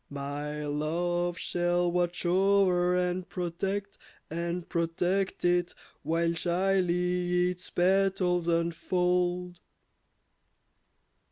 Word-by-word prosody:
My 145 +1 -4
love 175 +4 -1
shall 175 0 0
watch 175 0 -1
o'er, 185 -1 +3
and 180 0 -1
protect, 195 +3 -3 0.3
and 170 +1 -3
protect 175 +4 -1
it, 175 0 +1 0.3
While 165 +2 0
shyly 180 0 +1
its 180 0 -10
petals 185 -1 +2
unfold. 180 +1 0
175 Hz, 80 wpm, -29 LUFS, 170-180 Hz, 0.3 s, o'er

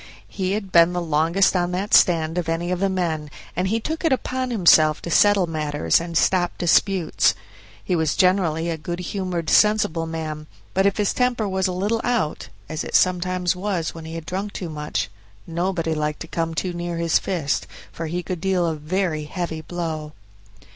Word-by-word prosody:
He 190 -1 -2
had 200 -2 -4
been 170 +1 +5
the 180 - -1
longest 165 +4 +2
on 175 -1 +1
that 195 +3 -2
stand 165 -1 +4
of 170 -2 -3
any 170 +2 -1
of 180 - -1
the 195 +1 +1
men, 165 -5 -2 0.3
and 180 +2 0
he 220 +4 0
took 315 +9 -4
it 325 - +2
upon 260 0 -1
himself 160 -8 +5
to 170 - -5
settle 205 -1 +5
matters 150 - 0
and 170 -1 -3
stop 175 -1 +2
disputes. 175 - +2 0.5
He 180 - 0
was 160 -2 +1
generally 180 -3 +2
a 165 -2 -3
good 175 +3 -4
humored, 180 -2 -3
sensible 195 -5 +3
man; 155 -2 -5 0.3
but 190 +1 +3
if 200 - 0
his 210 -2 +1
temper 250 -4 +1
was 190 0 0
a - - -2
little 205 +5 -1
out, 235 -11 -1 0.2
as 155 +1 -4
it - - -8
was - - +8
sometimes 180 0 +1
when 175 -4 -3
he 160 +1 -7
had 165 -1 -6
drunk 195 +4 -4
too 175 - -5
much, 130 -10 -3 0.3
nobody 170 -1 -1
liked 150 -1 -2
to 165 - -6
come 165 0 -2
too 180 +2 -2
near 175 0 -4
his 170 -1 +2
fist, 165 -7 -2 0.2
for 165 - -5
he 175 +3 -3
could 180 -2 -5
deal 185 -2 +1
a 165 - 0
very 155 0 -2
heavy 165 -1 -4
blow. 160 -2 -5
175 Hz, 195 wpm, -22 LUFS, 160-190 Hz, 0.5 s, was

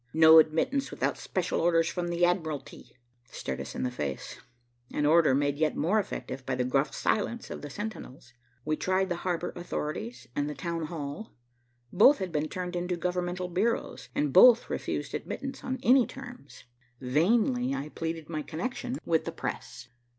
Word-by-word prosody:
"No 160 0 +9
admittance 165 - +1
without - - -1
special - - -2
orders 165 -1 +3
from 175 0 -2
the 175 0 +2
admiralty," 160 -8 -3 0.3
stared - - -5
us - - -7
in - - -2
the 125 - -1
face, 70 - -5 0.5
an 150 - 0
order 155 -3 +5
made 145 +1 0
yet 155 -1 +1
more 195 +8 +2
effective 135 -9 -5
by 130 0 -2
the 125 - 0
gruff 135 +3 +1
silence 235 +2 -1
of - - -6
the 145 - -7
sentinels. 140 - -7 0.3
We 155 0 0
tried 190 +1 +1
the 175 - -1
harbor 175 -1 -2
authorities 130 -8 -5
and 145 +1 0
the 150 - -5
Town 170 -3 -3
Hall. 155 +5 -6 0.6
Both 275 +7 +7
had 185 -2 -4
been 150 0 -1
turned 180 -1 -4
into 175 0 -2
governmental 180 +1 -2
bureaus, 195 +7 -1
and 145 -2 0
both 245 - +7
refused - - -3
admittance 270 -1 -5
on 260 0 -2
any 255 0 +5
terms. 245 - -11 0.4
Vainly 135 - +2
I 140 +3 -4
pleaded 160 0 -4
my 155 -2 -3
connection 245 - -4
with 165 -1 +1
the - - -3
press. 125 - -6
165 Hz, 170 wpm, -29 LUFS, 145-185 Hz, 0.6 s, No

